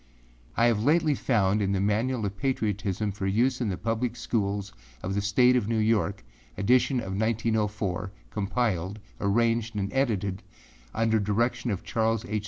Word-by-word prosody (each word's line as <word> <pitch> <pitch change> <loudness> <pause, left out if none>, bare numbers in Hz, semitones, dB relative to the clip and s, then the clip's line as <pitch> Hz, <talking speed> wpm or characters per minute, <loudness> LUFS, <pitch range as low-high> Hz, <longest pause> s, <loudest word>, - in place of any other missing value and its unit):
I 115 - +4
have 115 -3 +2
lately 155 +2 +3
found 105 -6 +1
in 100 0 +1
the - - +1
âManual 110 +4 0
of 100 0 -3
Patriotism 105 -5 -1
for 95 0 -3
Use 125 +6 +1
in 115 - 0
the 95 - -2
Public 115 +3 -1
Schools 100 -4 -2 0.3
of 95 - -2
the 100 - 0
State 125 +5 +4
of 120 -5 +1
New 115 0 0
York, 105 -4 +1 0.3
Edition 125 +6 +3
of 95 -5 -5
1904, 105 -3 -1 0.2
Compiled, 100 -3 -1 0.2
Arranged 115 +2 +1
and 100 -1 -2
Edited 100 -8 0 0.5
under 110 0 +2
direction 115 +4 0
of 100 -5 -2
Charles 115 0 0
R. 105 -3 -1
110 Hz, 160 wpm, -27 LUFS, 100-115 Hz, 0.5 s, I